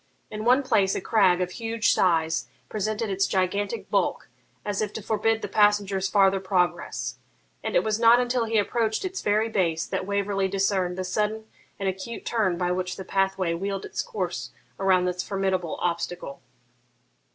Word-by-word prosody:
In 215 +1 -5
one 255 +4 +5
place 195 -7 +2
a - - 0
crag 185 -3 +3
of 180 0 -1
huge 225 +2 0
size 165 -3 +2 0.2
presented 215 +1 -2
its 195 0 +1
gigantic 200 +4 -1
bulk, - - 0 0.4
as 205 -1 -1
if 210 -1 -1
to 220 - -5
forbid 220 +1 0
the - - -1
passenger's 205 -2 +2
farther 195 -1 +4
progress; 180 -2 -1 0.4
and - - -3
it 175 - +4
was 215 0 0
not 235 +1 +7
until 245 -1 +1
he 225 0 0
approached 220 - 0
its 375 +1 -4
very 215 +2 +2
base 170 -7 0
that 185 - -3
Waverley 200 -1 0
discerned 190 -2 0
the 185 - -2
sudden 210 +4 -1 0.3
and 195 - -2
acute 190 +5 -4
turn 205 -7 +1
by 180 0 0
which 180 0 -2
the 190 - -8
pathway 190 -3 0
wheeled 195 +3 -3
its - - -3
course 480 -2 -4 0.3
around 190 -2 +3
this 180 0 -1
formidable 190 -4 -1
obstacle. 170 -4 -3
195 Hz, 170 wpm, -26 LUFS, 185-215 Hz, 0.4 s, not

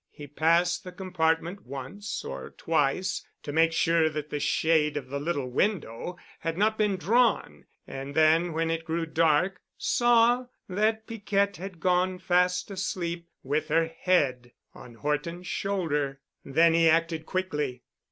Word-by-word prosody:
He 145 - -10
passed 165 +4 +2
the 180 - -8
compartment 180 0 -1
once 140 +11 -6
or 65 -1 -7
twice 165 +4 0 0.2
to 145 - -5
make 165 +1 +4
sure 165 -1 +3
that 150 -1 -5
the 150 - -2
shade 150 0 +2
of 130 -3 -6
the 140 +1 -3
little 145 -3 -2
window 175 - -1 0.2
had 165 0 -3
not 215 +2 +2
been 210 -3 +1
drawn 215 - +1 0.2
and 135 +1 -7
then 160 +2 +4
when 165 +1 0
it 165 0 -2
grew 165 0 -2
dark 165 +3 +2 0.2
saw 240 +1 +3 0.2
that 215 +3 0
Piquette 200 -3 -1
had 185 0 -8
gone 180 +2 +1
fast 180 +1 +1
asleep 175 -3 -3
with 150 +3 -1
her 165 +1 +3
head 140 -9 0 0.2
on 120 -2 -13
Horton's 150 +7 -3
shoulder. 155 -9 -1 0.2
Then 165 +4 +4
he 165 0 +5
acted 165 0 +1
quickly. 150 -9 -2
165 Hz, 145 wpm, -27 LUFS, 150-185 Hz, 0.2 s, he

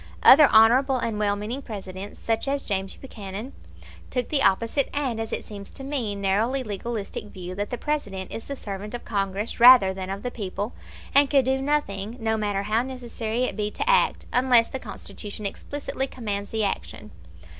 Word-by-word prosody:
Other 290 +2 +9
honorable 245 +5 +6
and 225 -3 -2
well 205 -1 +2
meaning 220 +7 -4
Presidents, 200 -4 -7
such 225 +3 -1
as 275 0 0
James 195 -2 -2
Buchanan, 215 0 -8 0.6
took 250 -2 -2
the 290 -3 +2
opposite 230 +7 +2
and, 260 -6 -1
as 225 0 -4
it - - -3
seems 200 -2 -9
to 270 - -8
me, 265 -7 -2
narrowly 210 +7 +1
legalistic 215 -1 -4
view 185 -3 -8
that 205 +2 -3
the 245 - -3
President 205 -12 -3
is 225 - -6
the 280 - -4
servant 205 -1 -6
of 240 - -8
Congress 200 +1 -2
rather 235 -6 +8
than 190 0 -6
of 195 +1 -5
the 245 - -3
people, 205 0 -4 0.4
and 280 0 +5
can 275 -2 +4
do 265 +1 0
nothing, 240 -7 -1
no 220 -1 0
matter 205 -2 -1
how 215 +3 +1
necessary 240 -2 -3
it - - -1
be 210 -1 -1
to 425 - -4
act, - - +3
unless 245 -2 +5
the 265 - -5
Constitution 205 -1 -8
explicitly 275 +5 -3
commands 205 -6 -4
the 220 -1 -1
action. 200 - -4
225 Hz, 185 wpm, -25 LUFS, 200-260 Hz, 0.6 s, Other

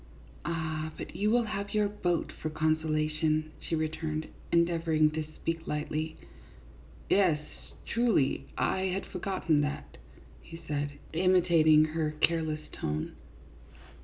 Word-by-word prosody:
"Ah, 160 -1 -2
but - - -7
you 210 +1 +1
will 240 +2 +4
have 205 -2 -4
your 210 -1 +3
boat 180 -5 -1
for 155 - -1
consola 155 0 +1
tion," 155 0 +1
she 165 - -2
returned, 155 0 -2 0.3
endeavoring 165 -2 +3
to 155 0 -2
speak 165 0 -3
lightly. 155 +1 -2 0.4
" - - -22
Yes, 180 -6 +4 0.5
truly, 230 - +2
I 190 0 +1
had 190 +1 -1
forgotten 180 -5 0
that," 145 0 -4 0.4
he 165 - -10
said, 145 -1 -1 0.2
imi 180 +1 +4
tating 155 -3 +5
her 155 -2 -1
careless 160 -2 +1
tone. 75 +1 -3
160 Hz, 130 wpm, -30 LUFS, 155-180 Hz, 0.5 s, tating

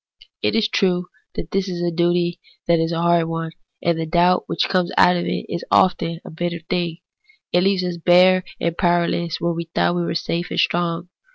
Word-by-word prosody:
It - - 0
is 225 -2 +2
true 180 -4 0 0.3
that 160 - -6
this 195 0 0 0.3
duty 175 0 +1 0.3
is 165 -1 +2
a 165 - -1
hard 170 -1 +3
one, 165 0 -4 0.3
and 170 -1 +1
the 160 - -3
doubt 175 +2 +3
which - - 0
comes 180 -2 0
out 180 0 +6
of 175 - -2
it - - -2
is 170 - -4
often 170 -2 +2
a - - -9
very 175 +2 -2
bitter 170 -2 -8
thing. 175 -2 -1 0.6
It 180 - +4
leaves 190 0 +2
us 180 -1 -3
bare 180 +2 +5 0.2
and 170 -1 -1
powerless 170 -1 0
where 170 +1 0
we 170 0 -4
thought 165 +1 0
that - - -3
we 175 - 0
were 170 - -2
safe 170 +1 -2
and - - -2
strong. 175 0 0
175 Hz, 205 wpm, -21 LUFS, 170-180 Hz, 0.6 s, out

